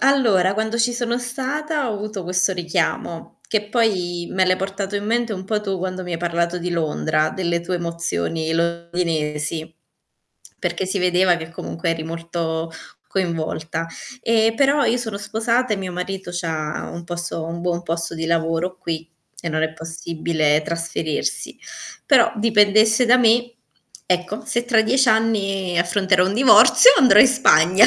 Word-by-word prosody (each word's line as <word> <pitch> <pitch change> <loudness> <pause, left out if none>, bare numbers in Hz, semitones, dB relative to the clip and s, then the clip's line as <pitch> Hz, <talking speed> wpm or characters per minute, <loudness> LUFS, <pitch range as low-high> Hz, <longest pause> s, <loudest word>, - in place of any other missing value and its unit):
Allora, 220 -9 +3
quando 220 +2 -2
ci 240 +1 +2
sono 240 0 -2
stata 270 +3 -3
ho - - -2
avuto 210 -1 -5
questo 185 +2 +1
richiamo, 170 -1 -3
che 210 -1 -1
poi 180 -7 0
me 190 0 +2
l'hai 185 - +4
portato 195 +1 -4
in 205 0 -2
mente 230 0 0
un 185 -1 -6
po' 210 +2 -1
tu 195 -2 -3
quando 185 0 -4
mi 180 - -6
hai 165 - -2
parlato 170 0 -1
di 175 0 -4
Londra, 155 - 0
delle 170 -2 -2
tue 180 +1 -3
emozioni 165 - -3
londinesi, 165 -2 -2 0.8
perché 190 - -2
si 190 +1 -2
vedeva 180 0 +3
che 160 -1 -8
comunque 165 0 -4
eri 160 -1 -3
molto 165 0 -4 0.4
coinvolta. 165 -3 -3 0.4
E 225 0 +2
però 280 +1 +3
io 245 - +1
sono 220 -4 -4
sposata 230 +3 -1
e 210 - +1
mio 190 -2 -5
marito 185 +1 -5
c'ha 160 -3 -3
un 170 - -7
posto 175 -1 -5
un 170 +1 -6
buon 175 0 -2
posto 170 0 -3
di 165 0 -4
lavoro 165 +2 -1
qui, 165 -2 -5 0.3
e 170 - -4
non 155 0 -1
è 160 - -1
possibile 160 -1 -1
trasferirsi. 165 -2 -3 0.5
Però, 260 -5 +5
dipendesse 215 +1 +4
da 245 +2 +5
me, 240 0 +3 0.5
ecco, 180 +3 -2
se 240 0 -1
tra 240 -2 +3
10 260 +3 +2
anni 195 -5 +1
affronterò 180 +1 +2
un 195 - -2
divorzio 250 - +7
andrò 250 -6 +6
in 260 - +9
Spagna. 190 -6 +5
180 Hz, 160 wpm, -21 LUFS, 165-220 Hz, 0.8 s, in